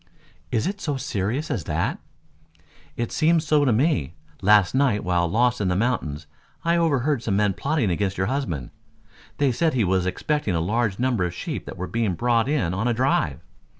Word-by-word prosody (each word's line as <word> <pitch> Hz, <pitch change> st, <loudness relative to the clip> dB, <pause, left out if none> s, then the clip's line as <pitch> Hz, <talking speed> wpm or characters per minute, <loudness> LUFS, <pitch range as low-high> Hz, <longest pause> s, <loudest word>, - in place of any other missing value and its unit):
"Is 110 Hz, -, 0 dB
it 200 Hz, +2 st, -3 dB
so 145 Hz, -4 st, -2 dB
serious 125 Hz, +3 st, -2 dB
as 80 Hz, -, -2 dB
that?" -, -, -1 dB, 1.0 s
"It 120 Hz, -1 st, -2 dB
seems 160 Hz, 0 st, +2 dB
so 150 Hz, -1 st, +3 dB
to 130 Hz, -, +3 dB
me. 115 Hz, -, +1 dB, 0.3 s
Last 105 Hz, -2 st, +5 dB
night 130 Hz, -6 st, +2 dB
while 90 Hz, -2 st, +1 dB
lost 120 Hz, +4 st, +2 dB
in 100 Hz, -, +1 dB
the 90 Hz, -, +1 dB
mountains 90 Hz, -, -1 dB, 0.4 s
I 170 Hz, +1 st, +3 dB
overheard 150 Hz, -5 st, +1 dB
some 105 Hz, -4 st, -1 dB
men 100 Hz, -1 st, +2 dB
plotting 140 Hz, -, 0 dB
against 95 Hz, +2 st, -1 dB
your 95 Hz, -, +1 dB
husband. 110 Hz, -, -3 dB, 0.7 s
They 140 Hz, -2 st, +2 dB
said 155 Hz, +4 st, +1 dB
he 120 Hz, -, +2 dB
was 95 Hz, -1 st, +1 dB
expecting 150 Hz, -, -1 dB
a -, -, +1 dB
large 105 Hz, +3 st, 0 dB
number 125 Hz, -5 st, +1 dB
of 90 Hz, 0 st, -3 dB
sheep -, -, -5 dB
that 95 Hz, -, -7 dB
were 90 Hz, -, -3 dB
being 110 Hz, -3 st, -1 dB
brought 120 Hz, +4 st, +1 dB
in 130 Hz, -, 0 dB
on 105 Hz, +6 st, -1 dB
a 120 Hz, -, +1 dB
drive." 110 Hz, -, +1 dB
115 Hz, 190 wpm, -24 LUFS, 95-140 Hz, 1.0 s, Last